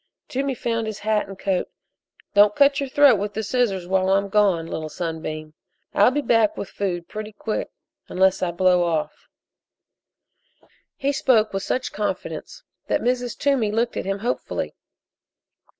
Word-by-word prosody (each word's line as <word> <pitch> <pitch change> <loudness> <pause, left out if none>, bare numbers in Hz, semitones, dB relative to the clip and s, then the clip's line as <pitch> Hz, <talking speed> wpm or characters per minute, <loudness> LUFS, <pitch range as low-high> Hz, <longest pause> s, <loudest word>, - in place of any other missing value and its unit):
Toomey 270 +1 -1
found 230 -1 -2
his 215 -2 -4
hat 215 -1 +1
and 195 -1 -9
coat. 190 -2 -1 0.6
"Don't 205 0 +5
cut 280 0 +4
your 275 -1 -2
throat 275 -6 +5
with 205 +1 -4
the 220 - -2
scissors 205 -5 0
while 190 0 +1
I'm 200 +1 +2
gone, 195 -5 +3
Little 160 -1 -5
Sunbeam, 155 -2 -5 0.4
and 200 - +4
I'll - - +7
be 290 +3 -1
back 225 -4 +3
with 200 - -5
food 175 -4 -3
pretty 215 0 -6
quick 215 +1 -3 0.4
unless 190 +1 +2
I 180 - +1
blow 180 +1 +3
off." 165 -3 -2 1.7
He 275 +1 0
spoke 230 -6 +2
with 195 - -1
such 255 +5 -2
confidence 210 - -4 0.2
that - - +1
Mrs. 245 0 -1
Toomey 275 -7 +1
looked 230 +2 0
at - - -3
him 195 +1 -1
hopefully. 245 - -2
210 Hz, 160 wpm, -23 LUFS, 185-245 Hz, 1.7 s, I'll